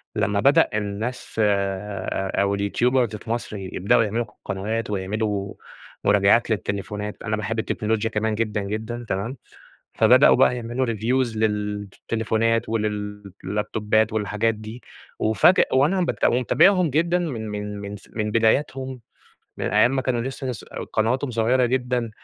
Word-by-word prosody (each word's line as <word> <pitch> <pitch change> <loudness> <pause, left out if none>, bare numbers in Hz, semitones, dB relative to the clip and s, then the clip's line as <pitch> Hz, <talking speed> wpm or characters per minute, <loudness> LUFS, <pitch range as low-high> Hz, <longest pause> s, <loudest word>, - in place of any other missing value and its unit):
لمّا 100 0 +1
بدأ 140 +6 +4
الناس 105 +4 -4
آآ، 100 -1 -1
أو 100 0 +1
الYouTubers 120 +2 +1
في - - -15
مصر 115 -3 -3
يبدؤوا 100 +5 +1
يعملوا 115 +3 -1
ق 105 - -23
قنوات، 105 +3 -3
ويعملوا 100 +1 -2 0.5
مراجعات 105 +3 +4
للتليفونات، 105 0 -3
أنا 110 -1 -1
باحب 110 +1 -3
التكنولوجيا 110 0 -1
كمان 110 0 -1
جدًا 105 -2 -1
جدًا، 110 +4 -4
تمام، 110 +8 -2 0.6
فبدؤوا - - +6
بقى 125 - +4
يعملوا 120 +2 -2
Reviews 115 +1 0
للتليفونات 110 +2 -1
ولل 105 -2 -3
اللابتوبات 105 +2 0
والحاجات 105 +1 0
دي، 110 +3 -9 0.4
وأُفاجأ 110 - +4
وأنا 150 +8 +3
بت 175 - 0
ومتابعهم 175 - +4
جدًا 170 +5 +1
من 120 -11 -3
من 105 0 -5
من 100 0 -6
س - - -19
من 105 -1 -2
بدايتهم، 130 +3 +1 0.6
من - - -3
أيّام 110 +7 +3
ما 130 - 0
كانوا 125 -3 0
لسّه 135 +2 -5
لس 125 -5 -5 0.3
قنواتهم 125 +5 0
صغيّرة 120 +2 +2
جدًا، 125 -2 -1
110 Hz, 140 wpm, -23 LUFS, 105-120 Hz, 0.6 s, فبدؤوا